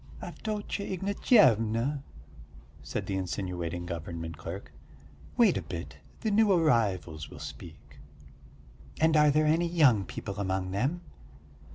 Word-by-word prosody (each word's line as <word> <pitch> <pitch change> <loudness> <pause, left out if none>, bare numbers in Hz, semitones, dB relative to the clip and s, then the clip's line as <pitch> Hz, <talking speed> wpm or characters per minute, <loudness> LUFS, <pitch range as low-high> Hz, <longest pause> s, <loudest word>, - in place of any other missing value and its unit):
"Avdotya 210 -2 -4
Ignatyevna," 140 - +3 0.8
said 80 +7 -4
the 95 - -3
insinuating 90 -2 -3
government 85 -1 -5
clerk, 85 +5 -8 0.6
"wait - - +5
a - - -2
bit, 75 -4 -7 0.2
the 220 - 0
new 215 0 +4
arrivals 100 - +1
will - - -11
speak." - - -10 1.0
"And 160 0 +4
are 150 -1 +6
there 155 +2 +3
any 165 +3 +2
young 145 - +4
people 100 +2 -6
among 95 -1 -1
them?" 135 - -1
110 Hz, 120 wpm, -29 LUFS, -, 1.0 s, are